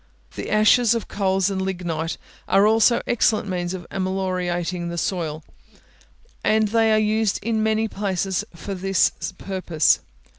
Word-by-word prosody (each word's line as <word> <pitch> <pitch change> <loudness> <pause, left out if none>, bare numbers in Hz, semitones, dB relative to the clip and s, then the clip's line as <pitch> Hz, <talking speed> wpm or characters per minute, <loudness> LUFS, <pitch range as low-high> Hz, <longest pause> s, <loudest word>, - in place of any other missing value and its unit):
The - - -6
ashes 220 +2 +4
of 230 - -3
coals 195 -1 0
and 190 -1 -2
lignite 175 -4 -3 0.3
are 195 +1 +4
also 225 +2 +4
excellent 220 -3 +1
means 180 -1 -2
of 175 -2 -8
ameliorating 185 -2 -2
the 170 - -5
soil, 160 -4 -2 1.0
and 215 -1 +2
they 225 0 +3
are 215 - +4
used 215 -1 +1
in 220 0 0
many 220 0 +1
places 195 -2 -2
for 185 +5 -6
this 195 0 +2 0.3
purpose. 185 -5 +1
195 Hz, 140 wpm, -22 LUFS, 180-215 Hz, 1.0 s, ashes